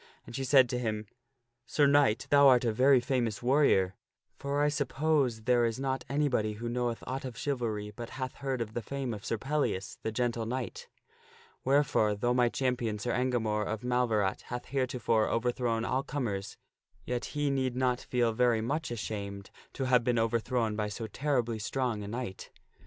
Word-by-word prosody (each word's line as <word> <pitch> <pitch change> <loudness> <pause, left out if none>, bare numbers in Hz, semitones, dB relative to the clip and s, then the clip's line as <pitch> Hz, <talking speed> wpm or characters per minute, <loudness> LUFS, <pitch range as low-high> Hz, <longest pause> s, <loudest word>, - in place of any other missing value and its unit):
And - - -9
she 135 - -2
said 130 -1 +6
to 125 - -1
him, 110 -3 -2 0.6
"Sir 145 - +3
Knight, 140 -5 +4
thou 140 -1 +7
art 125 -2 +5
a 115 - +1
very 130 +3 +5
famous 120 -3 -1
warrior; 125 -8 +3 0.4
for 140 +1 -1
I - - +4
suppose 140 -4 +1
there 120 0 +3
is 115 +1 0
not 135 -1 -2
anybody 130 -7 +1
who 115 +3 -6
knoweth 120 -1 -2
aught 135 +1 -4
of 125 -3 -6
chivalry 115 -7 -2
but 120 0 -7
hath 130 -1 -4
heard 135 -3 -2
of 110 -1 -4
the 120 - -2
fame 135 0 -4
of 105 -1 -7
Sir 115 - -1
Pellias, 130 -7 -2
the 110 - -2
Gentle 115 -1 -1
Knight. 295 - -4 0.8
Wherefore, 135 -7 +3
though 120 +4 +1
my 125 -1 +3
champion 120 -4 -1
Sir 120 +4 -2
Engamore 115 -4 0
of 110 0 -4
Mal 125 0 +1
verat 105 -3 0
hath 125 0 -5
heretofore 125 -4 0
overthrown 115 -1 0
all 130 - 0
comers, 115 -9 -4 0.5
yet 125 -1 -2
he 145 -1 +1
need 130 -2 0
not 125 -1 +1
feel 120 -2 0
very 120 -1 +3
much 150 +8 -2
ashamed 100 -4 -5 0.2
to 135 - -3
have 125 -2 +3
been 120 0 +1
overthrown 115 0 0
by 105 0 -1
so 105 +2 -5
terribly 120 -1 -1
strong 120 -1 -1
a 100 - -6
knight." 115 -3 -5
125 Hz, 180 wpm, -30 LUFS, 110-130 Hz, 0.8 s, thou